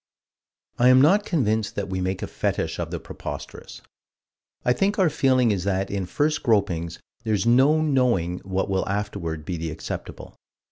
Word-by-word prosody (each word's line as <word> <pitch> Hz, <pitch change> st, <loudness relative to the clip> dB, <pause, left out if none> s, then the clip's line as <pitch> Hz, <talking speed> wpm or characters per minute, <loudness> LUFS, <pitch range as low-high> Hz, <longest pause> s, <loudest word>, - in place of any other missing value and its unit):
I 125 Hz, +1 st, +6 dB
am 130 Hz, 0 st, +7 dB
not 190 Hz, +9 st, +4 dB
convinced 110 Hz, -, 0 dB
that 100 Hz, -, -3 dB
we 95 Hz, -1 st, -3 dB
make 95 Hz, +1 st, -2 dB
a -, -, 0 dB
fetish -, -, -2 dB
of -, -, -3 dB
the -, -, -4 dB
preposterous. -, -, -8 dB, 0.8 s
I 125 Hz, -, +4 dB
think 200 Hz, +8 st, 0 dB
our 185 Hz, -6 st, +3 dB
feeling 130 Hz, -4 st, +3 dB
is 95 Hz, -4 st, -1 dB
that 95 Hz, 0 st, -1 dB
in 100 Hz, -3 st, -2 dB
first 150 Hz, -, 0 dB
gropings 90 Hz, -8 st, 0 dB, 0.3 s
there's 110 Hz, -2 st, 0 dB
no 135 Hz, +6 st, +5 dB
knowing 120 Hz, -, +1 dB
what 95 Hz, +1 st, -2 dB
will 95 Hz, -1 st, -1 dB
afterward 100 Hz, -6 st, -3 dB
be 90 Hz, 0 st, -3 dB
the 80 Hz, 0 st, -4 dB
acceptable. 80 Hz, 0 st, -7 dB
105 Hz, 170 wpm, -24 LUFS, 95-130 Hz, 0.8 s, am